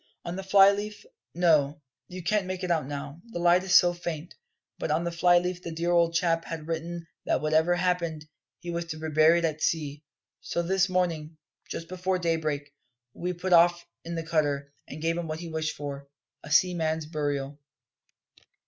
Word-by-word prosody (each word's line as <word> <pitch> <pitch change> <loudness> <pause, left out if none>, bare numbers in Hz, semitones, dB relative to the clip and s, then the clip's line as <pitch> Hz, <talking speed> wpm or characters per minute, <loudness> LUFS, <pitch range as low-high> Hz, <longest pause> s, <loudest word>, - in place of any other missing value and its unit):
"On 170 - -4
the 195 - -4
fly 195 +1 +6
leaf 210 - -5 0.3
no, 155 -4 +3 0.3
you 180 -1 -8
can't 195 +2 +1
make 185 0 -4
it 180 - -1
out 155 -5 +1
now, 140 +2 -6
the 225 - -7
light 175 +1 +4
is 185 -2 +2
so 175 -1 +7
faint 170 -2 -6 0.5
but - - -2
on 155 +3 +1
the 170 - -2
fly 175 +1 +4
leaf 180 0 -1
the 170 - -6
dear 170 +2 -1
old 170 -1 +3
chap 165 -1 +2
had 160 -2 -6
written 165 +1 -4 0.2
that - - +2
whatever 160 +3 +2
happened, 170 -4 -1 0.3
he 175 -1 -6
was 170 0 -3
to 155 -1 -6
be 160 0 -4
buried 160 +3 +4
at 155 -1 -2
sea. 150 -2 -1 0.4
So 170 - -2
this 190 +2 +2
morning, 165 -4 -1 0.3
just 165 - -5
before 185 +1 -1
daybreak, 155 -4 -2 0.4
we 180 +1 -3
put 180 +1 -1
off 175 0 +5 0.2
in 170 +1 -5
the 165 -1 -4
cutter, 145 -3 0
and 155 +2 -8
gave 165 +1 +1
him 170 - -4
what 155 0 -4
he 170 - -6
wished 160 -1 -2
for 140 -1 -6 0.4
a 150 - -9
seaman's 160 -2 +2
burial." 145 -2 -3
170 Hz, 190 wpm, -27 LUFS, 155-175 Hz, 0.5 s, so